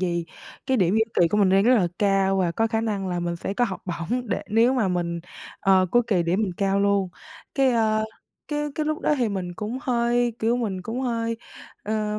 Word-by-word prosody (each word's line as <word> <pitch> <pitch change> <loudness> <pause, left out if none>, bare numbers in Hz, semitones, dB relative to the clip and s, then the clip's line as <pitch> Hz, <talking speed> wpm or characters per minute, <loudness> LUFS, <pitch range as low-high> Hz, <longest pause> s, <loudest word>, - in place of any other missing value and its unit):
vì 170 -2 -1 0.4
cái 265 -1 +2
điểm 185 -2 +2
giữa 220 0 +4 0.2
kỳ 170 - +5
của 210 - 0
mình 200 -2 +4
đang 195 +1 +4
rất 250 +2 +6
là 190 -7 +3
cao 195 -1 +2
và 175 -3 +1
có 225 - +1
khả 225 0 -1
năng 205 -4 -2
là 175 -1 -2
mình 170 0 -2
sẽ 195 +3 -4
có 245 - +2
học 195 -5 -5
bổng, 200 +8 -3
để - - -1
nếu 230 +4 +4
mà 220 -6 +1
mình, 170 -2 -2 0.4
à, 195 - +3 0.2
cuối 240 0 +4
kỳ 185 -5 +2
điểm 180 +6 +1
mình 190 -4 -1
cao 195 0 +1
luôn. 200 -2 +2 0.5
Cái, 270 -2 +3
à, 220 -2 +2 0.5
cái 295 0 -1
cái 305 -1 -2
lúc 310 0 -1
đó 300 - +2
thì 240 -3 +1
mình 185 -3 -4
cũng 220 +6 -4
hơi, 240 -1 +1
kiểu, 230 +2 +1
mình 200 -6 -3
cũng 225 +7 -4
hơi, 230 -2 -1 0.5
ờ, 210 0 -2
210 Hz, 230 wpm, -24 LUFS, 190-235 Hz, 0.5 s, rất